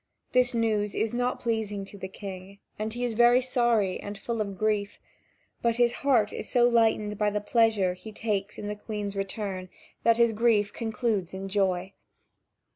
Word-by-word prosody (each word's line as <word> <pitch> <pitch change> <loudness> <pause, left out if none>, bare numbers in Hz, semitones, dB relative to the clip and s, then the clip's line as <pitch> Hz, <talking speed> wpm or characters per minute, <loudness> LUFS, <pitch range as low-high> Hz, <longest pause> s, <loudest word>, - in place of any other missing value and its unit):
This 250 -1 +3
news 215 -3 0
is 220 0 0
not 245 +1 0
pleasing 215 -4 -2
to 200 - -13
the 190 -1 -6
King, 195 0 -9 0.2
and 215 +1 -2
he 240 +2 -4
is 240 - -2
very 240 +2 +6
sorry 240 -6 +1
and 205 0 -7
full 230 +2 -3
of 200 -2 -4
grief; 210 -1 0 0.6
but 235 -1 +2
his 240 0 +3
heart 240 -7 +3
is - - -5
so 240 -2 +4
lightened 220 -3 +2
by 210 -1 +3
the 210 0 -1
pleasure 210 -4 +2
he 215 +4 -10
takes 210 -2 -2
in 205 - -5
the 210 - -3
Queen's 210 -1 -5
return, 195 -2 -4 0.3
that 230 0 +4
his 235 -1 +4
grief 215 -2 +2
concludes 220 -5 -2
in 190 +1 -5
joy. 190 -1 0
215 Hz, 180 wpm, -27 LUFS, 200-235 Hz, 0.6 s, very